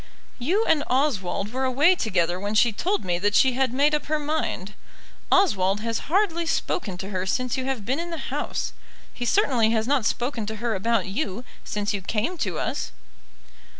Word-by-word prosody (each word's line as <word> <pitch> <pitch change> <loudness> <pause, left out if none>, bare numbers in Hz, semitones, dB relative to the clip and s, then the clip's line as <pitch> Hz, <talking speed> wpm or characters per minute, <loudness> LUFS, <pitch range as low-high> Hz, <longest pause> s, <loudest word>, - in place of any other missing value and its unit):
"You 370 - +1
and 300 -2 +3
Oswald 235 -6 0
were 260 +1 -1
away 275 +7 +4
together 180 - 0
when 205 +2 -3
she 230 +2 +5
told 370 - -1
me 175 -1 0
that 205 +2 +1
she 260 -1 +5
had 260 -1 +1
made 285 +4 +3
up 300 - 0
her 310 +1 +1
mind. 295 -10 -2 0.6
Oswald 205 - +3
has 230 0 -1
hardly 340 -2 +1
spoken 200 - -1
to 190 +2 -6
her 185 -1 -2
since 250 +4 0
you 260 -1 -2
have 260 -6 -3
been 265 +7 0
in 340 +1 -4
the 330 -2 -5
house. - - -2 0.4
He 245 - -4
certainly 250 - +3
has 220 -1 +1
not 270 -5 +2
spoken 240 -3 -2
to 220 - -3
her 235 +1 -1
about 215 +1 +1
you 205 +1 -3 0.2
since 205 0 -2
you 200 - -2
came 220 - -1
to - - -2
us." - - -2
240 Hz, 190 wpm, -25 LUFS, 205-295 Hz, 0.6 s, she